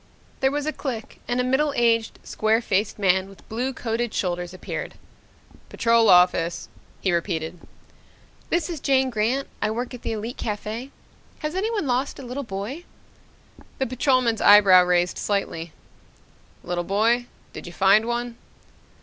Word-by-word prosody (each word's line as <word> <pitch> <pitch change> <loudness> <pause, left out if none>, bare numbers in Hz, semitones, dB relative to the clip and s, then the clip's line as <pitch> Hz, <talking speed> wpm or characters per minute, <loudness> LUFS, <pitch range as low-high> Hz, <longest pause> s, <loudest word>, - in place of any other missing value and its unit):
There 265 - +3
was 290 +1 -2
a 310 - -1
click 235 -6 -6
and 245 +1 -1
a - - +2
middle 275 +3 +1
aged, 230 -2 +2
square 220 +1 +1
faced 205 -2 -1
man 190 -1 +2
with 195 - -17
blue 245 +4 -2
coated 235 -2 -3
shoulders 175 -1 -2
appeared. 185 - -6 0.7
"Patrol 230 -1 +3
Office," 180 -1 +3 0.3
he 190 - +1
repeated. 170 -1 -2 0.9
"This 335 -2 0
is 335 -4 -5
Jane 265 -1 +2
Grant. 235 +5 0
I - - +1
work 240 +4 -4
at 245 - -8
the - - -3
Elite 225 +3 -5
Cafe. 215 +4 -4 0.5
Has 305 0 -3
anyone 415 0 -1
lost 255 +1 -1
a - - -9
little 250 +3 -4
boy?" 220 - -6 0.9
The 265 - 0
patrolman's 255 -2 +1
eyebrows 195 -3 +7
raised 180 0 +1
slightly. 170 -5 -2 0.9
"Little 175 0 -2
boy? 230 +6 +1 0.3
Did - - -8
you 175 - -9
find 195 +5 +4
one?" 240 0 -3
225 Hz, 150 wpm, -24 LUFS, 195-255 Hz, 0.9 s, eyebrows